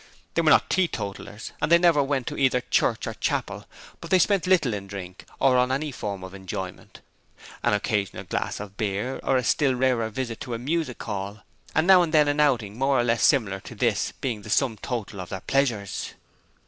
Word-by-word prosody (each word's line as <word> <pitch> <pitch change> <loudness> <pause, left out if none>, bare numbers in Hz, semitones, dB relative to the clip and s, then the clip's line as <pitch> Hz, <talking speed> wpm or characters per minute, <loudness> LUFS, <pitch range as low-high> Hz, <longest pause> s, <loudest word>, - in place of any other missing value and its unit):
They - - +2
were - - +3
not - - +5
teetotallers 110 - -2
and 150 +2 0
they 170 - +9
never 170 -4 +4
went 135 -2 -1
to - - -4
either 130 -2 +2
church - - +1
or - - -4
chapel, - - -3 0.3
but - - -9
they 185 - +5
spent 190 0 +2
little 165 -11 +3
in 100 -1 -5
drink 95 -2 -8
or 130 -2 +4
on 125 +1 +2
any 145 +3 -1
form 100 -6 -5
of 95 0 -9
enjoyment 95 -1 -7 0.6
an - - +2
occasional 100 -2 -2
glass 90 - -3
of 100 -1 -9
beer 110 +4 -2
or 135 - +2
a 125 - 0
still 135 +2 +2
rarer 125 -3 +1
visit 115 0 -4
to 120 - -4
a - - -3
music 145 +1 -2
hall 100 0 -5 0.3
and 160 - +3
now 185 -1 +7
and 165 -2 0
then 150 -1 +5
an 145 +1 0
outing 120 -7 +1
more 135 -1 +2
or - - +3
less 115 -2 +1
similar 105 -9 +3
to - - -11
this - - 0
being 115 -6 -2
the 105 - -11
sum 125 +1 +2
total 105 -4 -5
of 90 - -8
their 95 - -5
pleasures. 120 -8 -1
120 Hz, 210 wpm, -25 LUFS, 100-140 Hz, 0.6 s, they